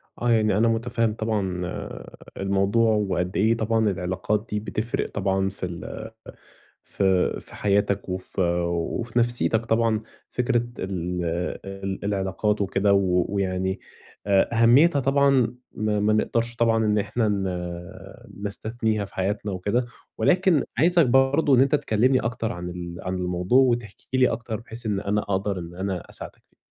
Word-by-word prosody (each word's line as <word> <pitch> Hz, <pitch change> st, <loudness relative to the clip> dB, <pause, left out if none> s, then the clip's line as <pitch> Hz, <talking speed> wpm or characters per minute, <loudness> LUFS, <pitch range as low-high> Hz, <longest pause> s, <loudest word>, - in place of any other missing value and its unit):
آه، 120 Hz, -, -1 dB
يعني 110 Hz, -3 st, +3 dB
أنا 115 Hz, +2 st, +4 dB
مُتفهم 115 Hz, -1 st, 0 dB
طبعًا 100 Hz, -5 st, -2 dB
آآ 90 Hz, -, -7 dB, 0.2 s
الموضوع، 100 Hz, +4 st, +2 dB
وقد 95 Hz, -3 st, -1 dB
إيه 110 Hz, +3 st, +3 dB
طبعًا 110 Hz, -1 st, +1 dB
العلاقات 95 Hz, +4 st, -1 dB
دي 105 Hz, -, -1 dB
بتفرِق 110 Hz, +2 st, -3 dB
طبعًا 95 Hz, -1 st, 0 dB
في 95 Hz, -1 st, -5 dB
ال 90 Hz, +5 st, -7 dB, 0.7 s
ف 100 Hz, -, -3 dB, 0.4 s
في -, -, -10 dB
حياتك، 100 Hz, -1 st, 0 dB
وف 95 Hz, +1 st, -5 dB
وفي 85 Hz, +7 st, 0 dB
نفسيتك 115 Hz, -1 st, +2 dB
طبعًا، 115 Hz, -1 st, +2 dB, 0.3 s
فكرة 120 Hz, -1 st, 0 dB
ال 90 Hz, -2 st, -3 dB, 0.4 s
ال 95 Hz, 0 st, -5 dB
العلاقات 100 Hz, +1 st, 0 dB
وكده، 100 Hz, +1 st, +2 dB
و 90 Hz, -2 st, +2 dB
ويعني 95 Hz, -1 st, -1 dB, 0.5 s
أ 100 Hz, +4 st, +3 dB
أهميتها 140 Hz, +6 st, +6 dB
طبعًا 135 Hz, -2 st, +3 dB, 0.2 s
ما 105 Hz, -1 st, -1 dB
ما 105 Hz, +1 st, +2 dB
نقدرش 115 Hz, +2 st, 0 dB
طبعًا 115 Hz, -1 st, +2 dB
إن 105 Hz, 0 st, +2 dB
إحنا 110 Hz, +2 st, 0 dB
ن 90 Hz, -1 st, -5 dB
نستثنيها 110 Hz, 0 st, -2 dB
في -, -, -16 dB
حياتنا 100 Hz, +2 st, -1 dB
وكده، 105 Hz, +7 st, 0 dB, 0.3 s
ولكن 180 Hz, -5 st, +3 dB, 0.2 s
عايزك 170 Hz, -1 st, +5 dB
برضه 135 Hz, +3 st, +4 dB
إن 125 Hz, -, +5 dB
أنت 140 Hz, +2 st, +4 dB
تكلمني 130 Hz, -1 st, +2 dB
أكتر 115 Hz, -1 st, -2 dB
عن 90 Hz, 0 st, -5 dB
ال 85 Hz, -1 st, -7 dB
عن 95 Hz, 0 st, -3 dB
الموضوع، 90 Hz, +6 st, +1 dB
وتحكي 120 Hz, 0 st, 0 dB
لي 125 Hz, -, +5 dB
أكتر 115 Hz, -1 st, -4 dB
بحيث 115 Hz, 0 st, -9 dB
إن 100 Hz, -2 st, 0 dB
أنا 105 Hz, +1 st, 0 dB
أقدَر 95 Hz, -1 st, -2 dB
إن 85 Hz, 0 st, -8 dB
أنا 95 Hz, -1 st, -4 dB
أساعدك -, -, -9 dB
فيه. -, -, -35 dB
105 Hz, 150 wpm, -24 LUFS, 95-115 Hz, 0.7 s, أهميتها